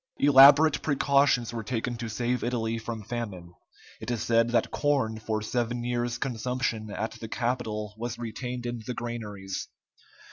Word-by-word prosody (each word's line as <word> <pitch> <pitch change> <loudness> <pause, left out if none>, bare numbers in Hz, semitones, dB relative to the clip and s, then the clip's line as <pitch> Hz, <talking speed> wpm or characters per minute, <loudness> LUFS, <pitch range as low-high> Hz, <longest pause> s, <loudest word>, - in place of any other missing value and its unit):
Elaborate 145 +2 +7
precautions 140 -4 +2
were 115 - -3
taken 120 +1 -2
to 115 -1 -5
save 120 +3 -1
Italy 115 -2 -1
from 110 -1 -6
famine; 105 -7 -6 0.5
it - - -6
is 120 -3 -1
said 115 0 +3
that 120 -1 +1
corn 135 -7 0
for 110 -1 -2
seven 120 +1 -2
years' 120 0 -1
consumption 120 -3 -2
at 110 +2 -3
the 110 - -6
capital 110 -3 -2
was 120 0 -4
retained 120 +1 -5
in 120 -1 -4
the 125 - -3
granaries. 105 -5 -5
120 Hz, 150 wpm, -27 LUFS, 110-125 Hz, 0.5 s, Elaborate